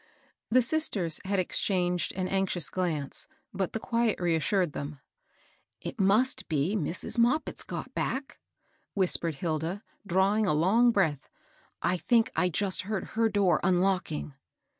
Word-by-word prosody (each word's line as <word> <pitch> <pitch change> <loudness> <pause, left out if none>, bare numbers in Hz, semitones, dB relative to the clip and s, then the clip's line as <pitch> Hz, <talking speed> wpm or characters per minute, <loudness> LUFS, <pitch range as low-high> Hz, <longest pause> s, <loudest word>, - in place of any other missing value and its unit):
The 255 +2 +4
sisters 210 - 0
had 200 +1 0
exchanged 180 -1 +1
an 185 0 -2
anxious 190 -4 0
glance, 160 -7 -2 0.3
but 190 -2 -2
the 220 - -2
quiet 230 -1 0
reassured 175 0 +1
them. 145 +1 -5
'^ - - -15 0.8
It - - -7
must 210 +7 +2
be 155 +6 0
Mrs. 185 +5 -2
Moppit's 250 +7 +1
got - - -6
back," 270 +1 -3 0.6
whisp^edi 170 -4 +3
Hilda, 165 +5 -3 0.2
drawing 195 +4 +2
a 150 - +2
long 220 +10 +4
breath. 160 - 0 0.3
" - - -36
I - - 0
think 230 +4 +2
I 180 - +2
just 190 +2 +1
heard 200 +1 -4
her 225 0 +2
door 200 -4 +2
unlocking." 180 -5 0
190 Hz, 140 wpm, -28 LUFS, 170-215 Hz, 0.8 s, The